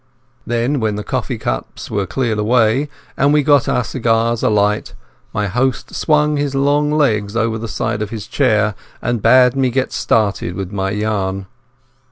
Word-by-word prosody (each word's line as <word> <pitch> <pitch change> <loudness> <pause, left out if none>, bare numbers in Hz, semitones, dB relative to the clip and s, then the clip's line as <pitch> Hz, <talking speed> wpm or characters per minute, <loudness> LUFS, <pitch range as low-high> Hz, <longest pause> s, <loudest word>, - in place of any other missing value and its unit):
Then 120 +4 0
when 110 -3 -1
the 105 - -4
coffee - - -3
cups - - -5
were 100 -2 -1
cleared 115 -5 -1
away, 115 +5 +2 0.3
and 140 +1 +3
we 150 0 +4
had - - -7
got 145 -3 +4
our 125 - +1
cigars 115 0 0
alight, 105 0 +1 0.4
my 105 - -1
host 125 +6 -1
swung 150 -1 +2
his 145 -1 -1
long 145 +2 +2
legs 110 -9 +1
over 110 -1 0
the 115 - -5
side 105 - -2
of 110 - -3
his 110 -2 -6
chair 110 -6 +1 0.3
and 120 -2 -2
bade 125 +3 +5
me 135 -1 +2
get 130 +2 -1
started 100 -5 0
with 95 -1 -5
my 95 -1 -2
yarn. 100 -2 -2
115 Hz, 175 wpm, -17 LUFS, 105-135 Hz, 0.4 s, bade